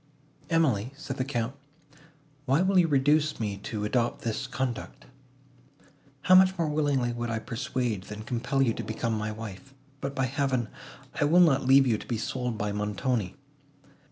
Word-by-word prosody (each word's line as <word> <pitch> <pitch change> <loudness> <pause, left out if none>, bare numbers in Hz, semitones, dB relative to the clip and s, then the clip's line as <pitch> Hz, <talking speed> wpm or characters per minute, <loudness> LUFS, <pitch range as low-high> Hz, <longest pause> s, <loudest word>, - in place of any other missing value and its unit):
"Emily," 135 - +1
said 160 - -6
the 130 - 0
Count, 125 -2 -2 0.9
"why 140 +6 +3
will 190 0 +4
you 170 - +4
reduce 150 +1 +2
me 105 -3 -2
to 105 +1 -4
adopt 120 +2 0
this 115 +3 -2
conduct? 125 -2 -4 1.2
How 185 - +5
much 190 0 +6
more 165 -2 0
willingly 145 -5 +1
would 120 0 -3
I 115 - -1
persuade, 115 -3 -3
than 105 +1 -8
compel 125 +4 0
you 115 -4 +2
to - - -5
become 115 +1 -2
my 110 0 -2
wife! 110 +5 -9 0.2
but, 140 0 -4
by 135 - +1
Heaven! 130 -3 -1 0.4
I - - +1
will 165 +5 +5
not 150 -7 +4
leave 135 +1 +7
you 115 -4 +1
to - - -11
be 120 - -1
sold 125 0 -3
by 105 0 -2
Montoni. 105 0 -1
125 Hz, 170 wpm, -28 LUFS, 110-140 Hz, 1.2 s, leave